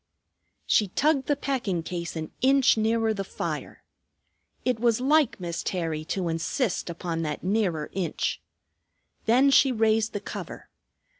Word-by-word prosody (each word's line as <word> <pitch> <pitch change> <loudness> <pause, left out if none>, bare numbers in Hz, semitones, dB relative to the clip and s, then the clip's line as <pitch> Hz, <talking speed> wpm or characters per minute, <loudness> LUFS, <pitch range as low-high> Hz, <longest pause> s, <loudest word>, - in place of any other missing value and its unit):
She 210 - +3
tugged 275 - +1
the 290 - +2
packing 240 - -2
case 170 0 -5
an 160 -1 -5
inch 270 0 +5
nearer 225 0 +1
the 200 -2 -3
fire. - - -5 0.8
It 250 -3 +1
was 235 -1 +2
like 285 -1 +3
Miss 170 -2 -4
Terry 165 -4 -2
to 185 +1 -2
insist 175 - -1
upon 165 -1 -3
that 150 -2 -3
nearer 185 -6 0
inch. 185 -3 -2 0.9
Then 260 +5 +5
she 270 0 +5
raised 220 -1 +2
the 205 - -2
cover. - - -8
215 Hz, 140 wpm, -26 LUFS, 170-250 Hz, 0.9 s, inch